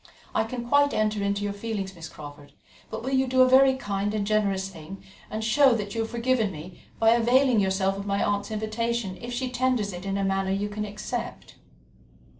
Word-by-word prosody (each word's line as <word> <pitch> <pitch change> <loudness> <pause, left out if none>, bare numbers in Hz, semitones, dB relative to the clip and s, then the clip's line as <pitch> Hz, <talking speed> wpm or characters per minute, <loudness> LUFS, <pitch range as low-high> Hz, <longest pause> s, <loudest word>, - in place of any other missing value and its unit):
"I 220 - +1
can 240 +1 -5
quite 285 +2 +3
enter 215 -1 +1
into 200 0 -1
your 205 0 -2
feelings, 200 -2 -4
Miss 165 -3 -9
Crawford, 145 -1 -11 0.4
but 220 +1 -6
will 260 - -3
you 265 0 +2
do 260 0 +3
a - - +4
very 265 +1 +6
kind 205 -3 -2
and 205 -1 -1
generous 200 -2 +1
thing, 180 +1 -10 0.3
and 220 +1 -4
show 255 +3 +4
that 205 -2 -4
you 225 - -1
have 225 - -3
forgiven 235 -3 0
me 170 +2 -10 0.2
by 225 0 +4
availing 240 +1 +4
yourself 190 0 +1
of 200 - -6
my 200 0 0
aunt's 205 0 -1
invitation 220 -1 -2
if 240 0 -6
she 250 +1 -3
tenders 250 -5 0
it 175 0 -7
in 195 0 -2
a 200 - -1
manner 195 0 0
you 200 +2 -1
can 210 +1 -4
accept?" 210 +4 -6
215 Hz, 210 wpm, -26 LUFS, 195-240 Hz, 0.4 s, very